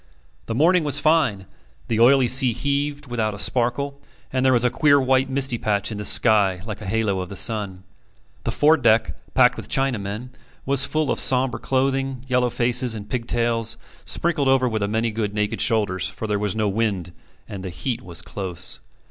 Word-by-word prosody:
The 115 - -3
morning 170 +6 +3
was 145 -2 +2
fine, 150 -12 +1 0.4
the 110 - -1
oily 130 +2 +5
sea 130 -1 +4
heaved 145 +3 -2
without 115 -4 -2
a - - -9
sparkle, 130 +6 0 0.3
and 130 -1 0
there 130 - +4
was 120 -2 +3
a 125 - +2
queer 145 -2 +4
white 130 0 +1
misty 135 -3 -1
patch 100 0 -1
in 105 - -5
the 105 - -4
sky 100 -6 +4
like 110 -1 -7
a 105 - -7
halo 105 -2 0
of 90 -1 -5
the 100 - -8
sun. 100 -4 0 0.6
The - - -2
fore 155 +2 +4
deck, 115 -4 +2 0.2
packed - - +4
with - - -8
Chinamen, 120 -3 -2 0.4
was 135 0 +2
full 155 -2 -1
of - - -1
sombre 130 -1 +2
clothing, 135 -1 -1
yellow 125 -1 +1
faces, 120 0 0
and 105 -1 -9
pigtails, 115 -2 -1 0.3
sprinkled 155 -5 0
over 135 -1 +3
with 110 -3 -2
a 100 - 0
good - - -6
many 115 +1 0 0.2
naked 105 0 -1
shoulders, 105 -6 +1
for - - -7
there 105 -1 -1
was 105 0 -2
no 110 -1 0
wind, 100 -4 -2 0.4
and 100 -4 -8
the 95 - -5
heat 120 +7 -4
was 85 -7 -5
close. 90 -10 -4
120 Hz, 190 wpm, -22 LUFS, 105-135 Hz, 0.6 s, oily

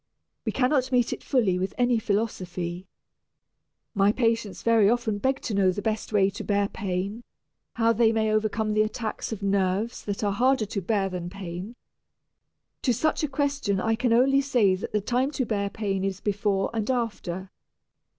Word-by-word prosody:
We - - 0
cannot 260 0 +1
meet 245 -2 +2
it - - -8
fully 210 -10 +2
with 190 +1 -3
any 245 -2 +3
philosophy. 185 -4 -2 1.1
My 200 +1 +4
patients 225 -3 -1
very 225 -3 +5
often 230 -3 0
beg 265 +4 0
to 220 - -4
know 195 -2 +3
the 200 +2 -5
best 220 0 -2
way 200 -2 +3
to 200 - -7
bear 200 -1 +1
pain, 195 +4 -3 0.5
how 230 0 +3
they 225 0 +4
may 220 -1 +1
overcome 215 0 0
the 215 - +3
attacks 215 +1 -3
of 210 -2 -5
"nerves" 195 +3 0
that 205 0 -3
are 205 - +2
harder 250 +2 +2
to 200 -1 -4
bear 195 +1 0
than 180 -2 -5
pain. 190 +3 -7 1.1
To 250 - +2
such 310 +8 +1
a 305 - +1
question 280 -8 0
I 225 +4 +1
can 245 +1 0
only 270 +4 +4
say 245 -8 +3
that 185 - -4
the 210 - 0
time 250 +6 0
to 260 - -1
bear 200 -3 -1
pain 200 -2 -2
is 195 -1 -2
before 200 -1 0
and 220 0 -2
after. 205 -7 -2
215 Hz, 180 wpm, -26 LUFS, 195-235 Hz, 1.1 s, very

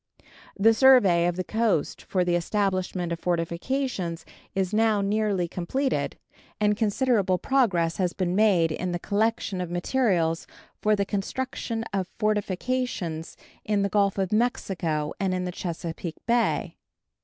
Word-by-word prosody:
The 225 +3 +5
survey 220 -9 +6
of 175 - 0
the 185 - -2
coast 220 -7 0
for 180 -2 0
the 175 - +1
establishment 185 -1 -1
of 170 - -2
fortifications 175 +1 -2 0.3
is 190 0 0
now 220 -1 +3
nearly 200 -3 0
completed, 260 +12 -2 0.4
and 210 0 +3
considerable 210 -3 +1
progress 180 -11 +1
has 180 -2 +1
been 180 -1 -1
made 190 -6 +4
in 180 +3 -3
the - - 0
collection 205 0 -1
of 180 - -4
materials 175 -3 0 0.3
for 215 0 +3
the 200 -1 0
construction 225 +3 -3
of 190 -2 -1
fortifications 210 -4 -2 0.3
in 205 -1 +1
the 200 - 0
Gulf 200 0 +2
of 190 0 -1
Mexico 175 -9 0
and 190 -2 0
in 180 - -2
the 180 - -3
Chesapeake 170 -1 -5
Bay. 235 0 +1
195 Hz, 140 wpm, -26 LUFS, 175-220 Hz, 0.4 s, survey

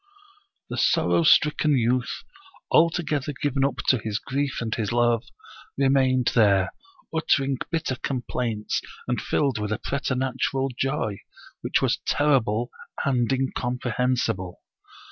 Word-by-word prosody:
The - - -2
sorrow - - +3
stricken 150 -2 +4
youth, 125 +1 0 0.5
altogether 155 -3 +2
given 140 -3 0
up 140 - +1
to 130 - +4
his 105 -1 -2
grief 140 +3 -2
and 115 -2 -3
his 110 -2 -2
love, 120 -1 +2 0.5
remained 130 -2 +3
there, 100 -4 +4 0.4
uttering 140 -4 +1
bitter 160 -6 -2
com 130 -1 -3
plaints 110 -4 -2 0.3
and - - -1
filled 135 -7 0
with 105 0 -3
a 110 - 0
preternatural 135 0 -1
joy, 135 -7 -1 0.4
which - - 0
was - - +2
ter 145 -2 +2
rible 110 +2 -2 0.4
and 125 -3 +1
incomprehensible. 125 -6 -1
130 Hz, 125 wpm, -25 LUFS, 115-140 Hz, 0.5 s, stricken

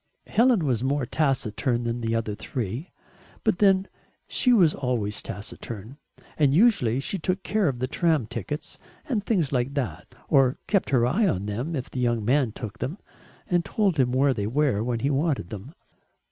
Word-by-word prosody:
Helen 230 -7 +3
was 125 -4 0
more 140 0 0
taciturn 125 -3 0
than 120 0 -2
the 115 0 0
other 115 -2 -1
three, 120 - -4 0.5
but - - +1
then 195 -2 +4 0.4
she 250 - +2
was 180 -10 +5
always 120 -6 -1
taciturn, 105 +4 -7 0.4
and 140 -2 +4
usually 170 - +4
she 190 +7 -3
took 185 +4 -1
care 210 -2 +1
of 135 -4 -1
the 130 +1 -2
tram 160 -3 +1
tickets 115 +5 -6 0.3
and 230 -8 -1
things 185 - +1
like 130 +1 -1
that, 135 -5 -3 0.2
or 135 -3 +4
kept 200 -3 +1
her 125 -3 +3
eye 200 - +2
on 100 - -1
them 120 +11 -3
if 130 -3 -5
the 130 - -4
young 120 -3 0
man 130 -1 +2
took 110 -2 -8
them, 145 +9 -3 0.5
and 175 -1 +2
told 195 -7 0
him 125 -2 +3
where 135 +2 +3
they 105 -4 -2
were 130 -3 +1
when 120 -1 -2
he 140 - +1
wanted 140 - 0
them. 110 - -8
135 Hz, 180 wpm, -25 LUFS, 115-165 Hz, 0.5 s, was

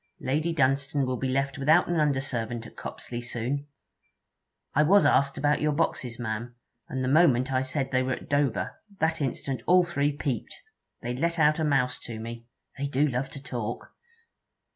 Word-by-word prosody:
Lady 150 +6 0
Dunstane 140 -1 +1
will 130 0 -1
be 135 - -1
left 135 +1 -1
without 155 +6 +4
an 175 -2 +1
under 145 -3 +2
servant 120 -3 -3
at - - -12
Copsley 120 -1 -6
soon. 125 +4 -3 1.1
I 150 - +4
was 195 +7 +5
asked 140 0 +3
about 145 0 +2
your 150 0 +2
boxes, 130 -6 -1
ma'am, 120 +1 -4 0.3
and 130 0 -2
the - - 0
moment 135 -3 +4
I 130 - +2
said 135 +1 -2
they 130 -1 +2
were 130 0 0
at - - -7
Dover, 145 -3 0 0.2
that 160 0 +1
instant 135 -2 -2
all 180 0 +6
three 145 -4 0
peeped. 135 -4 -3 0.5
They 120 +1 -2
let 170 +5 0
out 155 0 +4
a - - +1
mouse 135 -4 +1
to 115 -2 -7
me. 115 +1 -7 0.3
They 140 - -1
do 140 +2 +2
love 135 0 -2
to 140 +1 -9
talk!' 120 -3 -5
135 Hz, 185 wpm, -27 LUFS, 125-150 Hz, 1.1 s, all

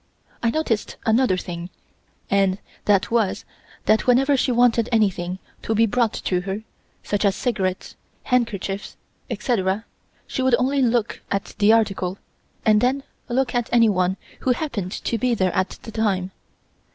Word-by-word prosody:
I 230 - +2
noticed 230 -6 -1
another 225 -3 +3
thing, 175 -1 -6 0.6
and 195 -1 +2 0.3
that 200 0 +3
was 225 -5 +1 0.4
that 215 +3 +3
whenever 270 +3 +4
she 260 0 +1
wanted 240 -1 +3
anything 190 -5 +1 0.2
to 220 - -1
be 225 +2 +5
brought 230 0 +1
to 180 -1 -1
her, 195 +3 -4 0.4
such 205 0 -1
as 200 -2 +3
cigarettes, 190 -7 -2 0.3
handkerchief, 215 -5 -1 0.3
etc., 215 -3 0 0.4
she - - -3
would 260 -2 +4
only 270 +2 +1
look 235 -2 +1
at 200 +1 -2
the 210 +1 +6
article 195 -4 +1 0.5
and 215 -1 +5
then 265 +2 +1 0.3
look 260 +2 0
at 240 -2 0
anyone 195 -6 +3 0.2
who 255 - +2
happened 240 - -3
to 230 - -2
be 245 +1 +2
there 185 -4 +1
at 185 0 -1
the 225 - -8
time. 195 -4 0
220 Hz, 150 wpm, -23 LUFS, 195-245 Hz, 0.6 s, the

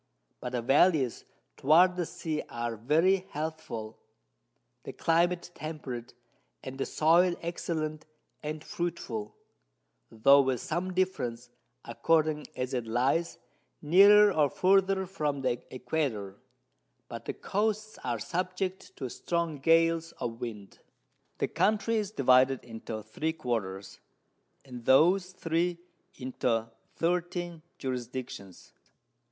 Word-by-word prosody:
But 125 - -6
the 120 -2 -1
Vallies 140 -1 +3 0.3
toward 175 +6 +5
the 175 -2 -2
Sea 155 -2 -3
are 120 -1 -3
very 165 - +2
healthful, 150 - -5 0.8
the - - -8
Climate 175 +2 +1
temperate, 135 -8 -7 0.5
and 135 +1 -7
the - - -1
Soil 170 +3 +4
excellent 155 -2 -3 0.3
and 150 +1 -5
fruitful, 125 -11 -4 0.7
tho' 140 +6 +6
with 130 -2 0
some 175 +7 -3
difference, 125 -11 -1 0.3
according 155 +4 +1
as 130 +1 -3
it 120 -3 -2
lies 135 +9 +1 0.4
nearer 200 +6 +7
or 150 -4 +3
further 190 +2 +3
from 150 -7 -2
the 125 -2 -1
Equator; 120 -7 -3 0.7
but - - -8
the - - -3
Coasts 215 +1 -2
are 120 -2 -1
subject 185 - -3
to 130 - -4
strong 170 +3 -2
Gales 165 +2 +3
of 115 0 -5
Wind. 105 -5 -7 0.6
The - - 0
Country 220 +2 +1
is 210 -3 -1
divided 130 - +4
into 110 -2 -7
3 155 +9 -3
Quarters, 105 -9 -4 0.7
and 125 -3 -9
those 180 +7 +4
3 170 +1 -1 0.4
into 120 -3 -1 0.2
13 175 0 -1 0.2
Jurisdictions. 125 -6 -6
155 Hz, 115 wpm, -29 LUFS, 125-175 Hz, 0.8 s, nearer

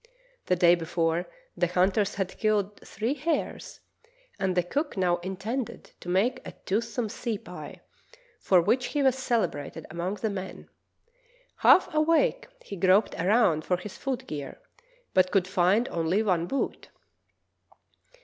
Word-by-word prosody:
The 180 - +3
day 175 -1 +5
before 165 0 0 0.3
the 175 - +1
hunters 190 +3 +1
had 190 -2 -4
killed 210 -2 0
three 225 +6 -3
hares, 305 +3 -3 0.6
and 190 -1 0
the 180 - +4
cook 285 - -3
now 180 -2 +2
intended 200 +7 -5
to 175 - -8
make 225 +8 +1
a - - -8
toothsome 225 +3 -1
sea 225 +1 -3
pie, - - -10 0.6
for 185 - +4
which 235 +8 +1
he 285 - +2
was 265 -2 +4
celebrated 235 - -2
among 175 +4 -3
the 210 +2 -2
men. 190 -1 -7 0.9
Half 365 -2 +5
awake, 325 +10 +2 0.2
he 200 - -7
groped 190 +4 +3
around 180 -4 +3
for 180 - 0
his 190 +3 -9
foot 265 -3 -4
gear, 145 - -7 0.5
but 185 0 +4
could 185 -1 +2
find 190 +5 +2
only 170 +5 0
one 175 -5 +1
boot. 275 - -3
195 Hz, 140 wpm, -27 LUFS, 180-235 Hz, 0.9 s, day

